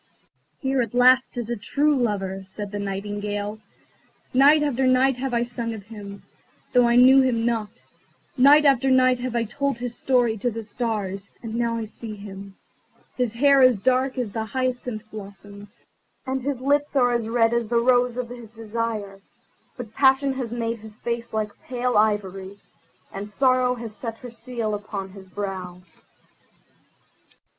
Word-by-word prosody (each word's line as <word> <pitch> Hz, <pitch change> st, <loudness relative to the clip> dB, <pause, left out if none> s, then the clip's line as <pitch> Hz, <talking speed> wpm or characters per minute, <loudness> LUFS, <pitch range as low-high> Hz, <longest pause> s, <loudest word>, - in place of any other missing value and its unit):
"Here 265 Hz, -1 st, 0 dB
at 230 Hz, 0 st, -4 dB
last 255 Hz, +1 st, +4 dB
is 240 Hz, -1 st, -3 dB
a -, -, 0 dB
true 290 Hz, +8 st, +1 dB
lover," 195 Hz, -6 st, -1 dB
said 205 Hz, +1 st, -7 dB
the 205 Hz, -, -4 dB
Nightingale. 205 Hz, +1 st, -4 dB, 0.7 s
"Night 290 Hz, +4 st, +6 dB
after 265 Hz, -3 st, +1 dB
night 255 Hz, 0 st, +3 dB
have 265 Hz, +1 st, -3 dB
I 235 Hz, 0 st, +1 dB
sung 235 Hz, -1 st, -4 dB
of 205 Hz, -, -9 dB
him, 200 Hz, -2 st, -10 dB, 0.5 s
though 245 Hz, -1 st, +5 dB
I 235 Hz, -, +3 dB
knew 260 Hz, +2 st, +7 dB
him 235 Hz, -3 st, +1 dB
not: 225 Hz, -3 st, -2 dB, 0.5 s
night 285 Hz, +3 st, +6 dB
after 270 Hz, -1 st, +4 dB
night 255 Hz, -1 st, +4 dB
have 245 Hz, -1 st, -4 dB
I 235 Hz, -, +2 dB
told 280 Hz, +3 st, -2 dB
his 240 Hz, 0 st, -5 dB
story 240 Hz, -5 st, +1 dB
to 245 Hz, -, 0 dB
the 225 Hz, -1 st, -6 dB
stars, 205 Hz, -3 st, -4 dB
and 225 Hz, -1 st, -6 dB
now 235 Hz, 0 st, 0 dB
I 225 Hz, -, -3 dB
see 215 Hz, 0 st, -8 dB
him. 200 Hz, -1 st, -10 dB, 0.6 s
His 245 Hz, -3 st, -1 dB
hair 275 Hz, +3 st, +4 dB
is 255 Hz, -3 st, +6 dB
dark 260 Hz, +5 st, +1 dB
as 240 Hz, -5 st, -2 dB
the 220 Hz, +2 st, -3 dB
hyacinth 250 Hz, -2 st, -3 dB
blossom, 205 Hz, 0 st, -10 dB, 0.6 s
and 265 Hz, 0 st, -2 dB
his 265 Hz, -1 st, -3 dB
lips 290 Hz, +2 st, +1 dB
are 245 Hz, -2 st, +3 dB
red 225 Hz, +1 st, +1 dB
as 235 Hz, -2 st, -1 dB
the 240 Hz, -, -1 dB
rose 245 Hz, 0 st, +2 dB
of 250 Hz, -2 st, -3 dB
his 240 Hz, -2 st, -10 dB
desire; 220 Hz, -3 st, -4 dB, 0.6 s
but 230 Hz, -3 st, -8 dB
passion 270 Hz, +1 st, +3 dB
has 255 Hz, -4 st, -4 dB
made 230 Hz, -1 st, -2 dB
his 215 Hz, 0 st, -12 dB
face 235 Hz, 0 st, -4 dB
like 215 Hz, -1 st, -4 dB
pale 250 Hz, 0 st, -2 dB
ivory, 200 Hz, -2 st, 0 dB, 0.6 s
and 200 Hz, +2 st, -6 dB
sorrow 255 Hz, +2 st, +2 dB
has 230 Hz, -3 st, -8 dB
set 225 Hz, +1 st, -6 dB
her 245 Hz, 0 st, -10 dB
seal 230 Hz, -2 st, -4 dB
upon 205 Hz, -2 st, -5 dB
his 190 Hz, -1 st, -13 dB
brow." 185 Hz, -2 st, -5 dB
235 Hz, 165 wpm, -24 LUFS, 210-255 Hz, 0.7 s, knew